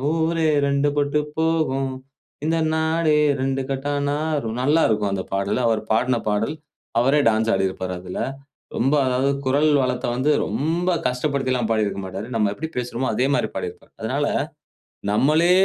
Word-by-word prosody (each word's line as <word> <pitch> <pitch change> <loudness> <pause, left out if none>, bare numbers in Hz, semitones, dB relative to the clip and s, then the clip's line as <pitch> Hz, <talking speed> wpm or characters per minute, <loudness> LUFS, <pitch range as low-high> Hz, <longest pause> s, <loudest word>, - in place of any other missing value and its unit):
ஊரே 165 0 +1 0.2
ரெண்டு 140 +1 +2
பட்டு 145 +1 +1 0.2
போகும். 155 -5 +1 0.5
இந்த 165 0 +1 0.2
நாடே 160 -1 +2 0.3
ரெண்டுங்கெட்டானாகும்" 140 -1 -1
நல்லாருக்கும், 110 -9 +2
அந்த 95 -1 -2
பாடல். 100 +5 0
அவர் 110 -1 +1
பாடுன 125 +2 +2
பாடல். 110 +8 0 0.5
அவரே 135 +5 +3
டான்ஸ் 110 0 +2
ஆடிருப்பாரு, 95 -1 -1
அதுல. 90 0 -6 0.6
ரொம்ப 135 +5 +2
அதாவது 130 +2 +1 0.2
குரல் 145 +4 +3
வளத்த 125 0 -1
வந்து, 130 +5 +1
ரொம்ப 160 - 0 0.2
கஷ்டப்படுத்திலாம் 130 -2 0
பாடி 110 -1 +2
இருக்க 100 - -3
மாட்டாரு. 95 +3 -6
நம்ம 105 -3 +2
எப்பிடி 160 +10 -5
பேசுறோமோ, 125 +1 -2
அதே 125 +4 +2
மாரி - - +1
பாடியிருப்பாரு. - - -6
அதுனால, - - -1 0.9
நம்மளே 155 +9 +3
135 Hz, 135 wpm, -22 LUFS, 110-150 Hz, 0.9 s, அவரே